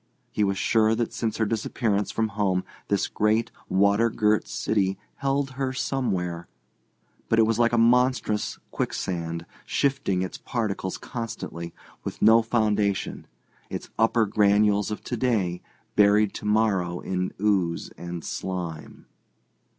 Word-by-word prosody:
He 105 - 0
was 100 -1 +1
sure 110 +1 +3
that 115 0 -2
since 110 -2 -2
her 110 - +2
disappearance 105 -1 -1
from 110 -1 0
home 100 -3 0 0.2
this 100 -1 +1
great, 110 +2 +1 0.2
water 100 +4 +3
girt 105 -1 +1
city 95 -3 0 0.2
held 140 0 0
her 130 0 -2
somewhere, 90 -11 -2 0.8
but 115 - +3
it 115 - +6
was 115 +1 0
like 120 -1 +4
a 120 - +2
monstrous 125 -2 +2
quicksand, 85 -2 -3 0.2
shifting 135 -10 0
its 95 - -6
particles 105 -5 -2
constantly, 110 -8 -6 0.3
with - - -5
no 115 +1 +6
foundation, 105 -3 0 0.4
its - - -6
upper 115 0 +4
granules 105 0 +3
of 105 - -5
to 125 - -3
day 110 -8 0 0.3
buried 105 0 +4
to - - -7
morrow 100 -5 +1
in 90 0 -2
ooze 95 -5 +1
and 85 -1 -6
slime. 90 -4 -5
105 Hz, 135 wpm, -26 LUFS, 95-115 Hz, 0.8 s, it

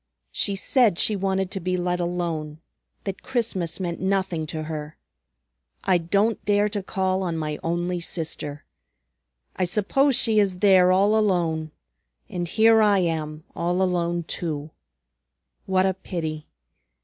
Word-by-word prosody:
She 200 - +1
said 220 - +3
she 215 - +1
wanted 190 -1 -1
to 195 - -3
be 185 +1 -1
let 180 0 -1
alone; 170 -3 -3 0.4
that 195 -1 -5
Christmas 215 -10 -2
meant 175 -2 -3
nothing 190 -4 -1
to 155 +1 -4
her. 155 -1 -6 0.9
I 185 -2 +3
don't 200 +7 +1
dare 205 0 +2
to 205 -1 -3
call, 190 0 -1
on 170 -3 -2
my 155 -1 -3
only 175 +1 -1
sister! 160 -3 -4 0.9
I 185 - 0
suppose 230 +9 +2
she 220 -3 +3
is 195 -3 +1
there 185 -2 +5
all 200 +3 +4
alone, 170 -7 +1 0.6
and 175 -1 -4
here 225 +4 +5
I 205 -2 +4
am 160 -3 -2
all 175 +2 0
alone, 175 -2 0
too. 155 -2 -4 1.0
What 190 0 +3
a 190 - +2
pity! 160 -5 -5
180 Hz, 140 wpm, -24 LUFS, 165-195 Hz, 1.0 s, there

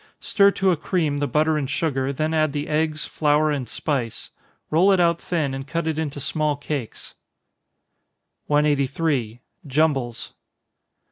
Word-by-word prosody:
Stir 200 -2 +4
to 190 -1 +3
a - - +2
cream 155 -3 -1
the 145 - 0
butter 155 +1 +2
and 135 -3 -3
sugar, 135 -3 -1
then 155 +3 -1
add 155 -2 +1
the 145 0 -3
eggs, 155 0 0
flour, 150 0 +2
and 135 -6 -3
spice. 130 -7 -3 0.4
Roll 175 +6 +5
it 190 - +3
out 170 -1 +2
thin, 155 -6 -1
and 135 +1 -6
cut 165 +3 -2
it 160 -1 -1
into 145 -3 -3
small 150 +2 -1
cakes. 140 -4 -6 1.3
183. 140 -4 0 0.3
_Jumbles. 135 -5 0
150 Hz, 145 wpm, -23 LUFS, 140-160 Hz, 1.3 s, Roll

